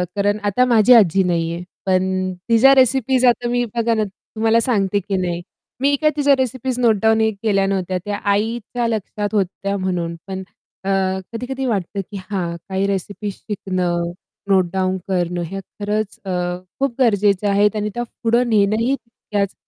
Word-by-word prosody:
कारण 205 +1 +1
आता 205 +5 +2
माझी 235 -1 +5
आजी 195 -5 +5
नाहीये, 170 -1 -1 0.2
पण 185 0 +1 0.2
तिच्या 235 +4 +6
रेसिपीज 260 0 +3
आता 240 0 +3
मी 245 0 +1
बघा 230 0 +1
ना, 215 - +1
तुम्हाला 220 +3 -1
सांगते 205 -5 +1
की 195 0 -3
नाही. 175 -2 -2 0.4
मी 285 +1 +3
काय 305 - +5
तिच्या 285 -1 +4
रेसिपीज 260 0 -2
नोटडाउनही 220 -1 +3
केल्या 195 -3 +2
नव्हत्या. 185 -1 -1
त्या 205 0 -2
आईच्या 230 +3 -1
लक्षात 210 -2 -2
होत्या 200 0 -1
म्हणून. 180 -3 -2
पण 190 -1 -4 0.4
अ, - - -1 0.4
कधी-कधी 260 +3 -4
वाटतं 200 -4 -1
की 205 - -5
हां, 175 -4 -2
काही 190 +1 0
रेसिपीज 200 +1 -3
शिकणं, 180 -4 -2 0.4
नोटडाउन 185 0 +2
करणं 175 -2 0
हया 195 +4 -5 0.2
खरंच 210 0 -2
अ, - - -5 0.5
खूप 270 -3 0
गरजेचं 205 -4 +3
आहेत 205 +2 +3
आणि 210 0 -1
त्या 240 - -1 0.2
पुढे 235 +2 +3
नेणंही 220 +2 +2
तितक्याच 210 -5 -4
205 Hz, 155 wpm, -20 LUFS, 190-235 Hz, 0.5 s, तिच्या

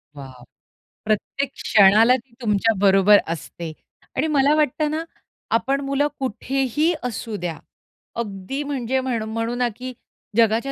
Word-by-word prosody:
Wow 130 -3 -11 0.6
.प्रत्येक 215 +6 -1
क्षणाला 215 +4 +5
ती 255 -1 -9
तुमच्या 220 0 +2
बरोबर 195 +1 +6 0.2
असते 165 0 -7 0.4
आणि 290 +5 +1
मला 290 -1 +3
वाटत 305 -1 +1
ना, 315 +1 -2 0.5
आपण 270 +5 0
मुलं 275 +1 +1
कुठेही 270 +5 0
असू 230 -2 -4
द्या. 175 -4 -4 0.6
अगदी 210 +5 -4
म्हणजे 265 -3 -1
म्हणू 240 -4 -2
म्हणू 230 +2 -3
ना, 245 0 +1
की 255 +2 -7 0.4
जगाच्या 230 +4 +3
235 Hz, 130 wpm, -22 LUFS, 210-270 Hz, 0.6 s, बरोबर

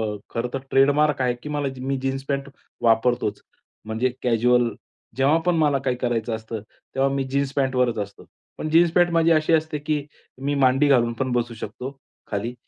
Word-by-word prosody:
अ, - - -7
खरं 115 +1 -2
तर 135 - -1
ट्रेडमार्क 145 +1 +3
आहे 125 -1 +2
की 150 - -6
मला 145 -1 -1
मी 135 - -4
जी 130 - -9
मी 135 0 0
जीन्स 135 0 -2
पॅट 140 0 -2 0.3
वापरतोच 115 -2 +2 0.4
म्हणजे 110 +4 0
कॅज्युअल 120 0 +3 0.5
जेव्हा 140 +4 +4
पण 180 -1 +3
मला 150 -3 +3
काही 130 -2 -1
करायचं 120 -2 -1
असतं, 110 0 -6 0.3
तेव्हा 135 +1 +2
मी 135 - 0
जीन्स 140 +1 -1
पॅन्टवरच 130 -4 +1
असतो. 100 0 -6 0.3
पण 155 - -3
जीन्स 170 +1 +5
पॅन्ट 175 0 +4
माझी 165 0 +3
अशी 155 +1 +3
असते 155 -1 +1
की 150 -1 -2 0.4
मी 140 +1 0
मांडी 135 +1 +4
घालून 120 -4 +3
पण 130 -1 -1
बसू 120 -1 -1
शकतो 125 +5 -7 0.3
खाली 105 +4 -2
135 Hz, 190 wpm, -23 LUFS, 120-145 Hz, 0.5 s, जीन्स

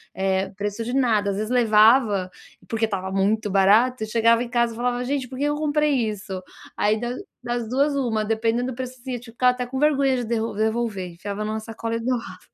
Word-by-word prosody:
eh, 190 0 0
preço 205 +2 -3
de 245 - -3
nada, 220 -6 +2
às - - -3
vezes 215 +3 -3
levava 215 -4 +4 0.4
porque 225 0 +1
estava 190 -3 -4
muito 205 +2 +1
barato, 220 +5 +4
chegava 230 +1 +3
em 245 - -3
casa 235 -1 +1
e - - -11
falava: 245 0 -1
"Gente, 265 0 -2
por 260 - -9
que 280 - -2
que 290 - +2
eu 295 - 0
comprei 295 -5 +1
isso?" 195 -2 -6 0.4
Aí 210 +1 +2
da 240 +1 -3 0.3
das 240 -1 -2
2, 275 +5 +1
1, 235 -6 0
dependendo 225 +3 0
do - - -8
preço, 255 0 -5
assim, 255 -1 -4
tipo, 230 -1 -14
ficava 250 +1 +4
até 250 0 -4
com 255 +2 -6
vergonha 280 -2 +3
de 245 - -2
devolver, 220 -3 -1
enfiava 200 +4 -5
em 215 - -3
uma 220 0 -2
sacola 225 +1 -4
e - - -4
doava. 240 0 -3
230 Hz, 215 wpm, -23 LUFS, 210-250 Hz, 0.4 s, levava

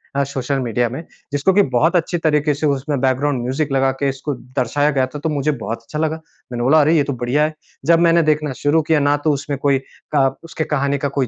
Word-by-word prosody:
अ, 140 - +2
social 135 0 -2
media 120 -1 0
में, 135 +7 -6 0.3
जिसको 145 +7 +2
कि 205 - +5
बहुत 165 +9 +3
अच्छी 175 +1 +1
तरीके 150 -2 +1
से 145 +2 -3
उसमें 140 0 -1
बैकग्राउंड 130 0 +1
म्यूज़िक 135 +3 -2
लगा 135 0 +2
के 140 - +1
इसको 135 +2 -4
दर्शाया 130 +4 -1
गया 135 -2 +1
था, 145 +3 -8
तो 160 - -2
मुझे 150 0 0
बहुत 115 -4 -5
अच्छा 150 +6 -6
लगा। 160 0 0 0.4
मैंने 120 -1 -3
बोला 155 +5 +5
अरे 155 +3 +3
ये 150 - +4
तो 140 - -3
बढ़िया 125 +4 0
है। 155 - 0 0.3
जब 165 0 +5
मैंने 170 0 +4
देखना 150 -2 0
शुरू 155 +3 +3
किया 155 0 +2
ना 145 0 +3
तो 155 - +5
उसमें 140 0 -3
कोई 140 -1 +2 0.4
क 135 -2 +3
उसकी 165 -1 -4
कहानी 140 -2 0
का 140 - -1
कोई 130 - +1
145 Hz, 240 wpm, -19 LUFS, 135-155 Hz, 0.4 s, कि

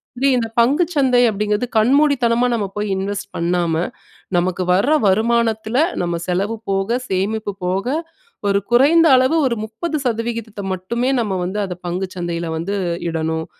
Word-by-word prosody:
மாதிரி 270 +3 +2
இந்த 225 -2 -1
பங்கு 275 +9 +4
சந்தை 260 -4 +3
அப்படீங்கிறது, 210 +3 -1
கண்மூடித்தனமா 250 -1 +3
நம்ம 220 -4 0
போய் 210 0 -2
இன்வெஸ்ட் 200 +2 -3
பண்ணாம, 170 -1 0 0.6
நமக்கு 180 +1 0
வர 200 +8 +2 0.2
வருமானத்துல 225 +2 +1 0.2
நம்ம 170 -1 -1
செலவு 195 +5 -1
போக, 195 +1 0 0.2
சேமிப்பு 205 +3 -1
போக, 190 +4 -1 0.6
ஒரு 200 0 +3
குறைந்த 300 +7 +5
அளவு 260 +5 +3
ஒரு 235 - -1
30%த்த 230 -5 -3
மட்டுமே, 235 +8 -2
நம்ம 210 -4 -1
வந்து 190 +4 -3
அதை 180 -2 -5
பங்கு 185 +2 -2
சந்தையில 170 -1 -3
வந்து 185 +5 -3 0.3
இடணும். 160 0 -2
210 Hz, 135 wpm, -19 LUFS, 185-240 Hz, 0.6 s, குறைந்த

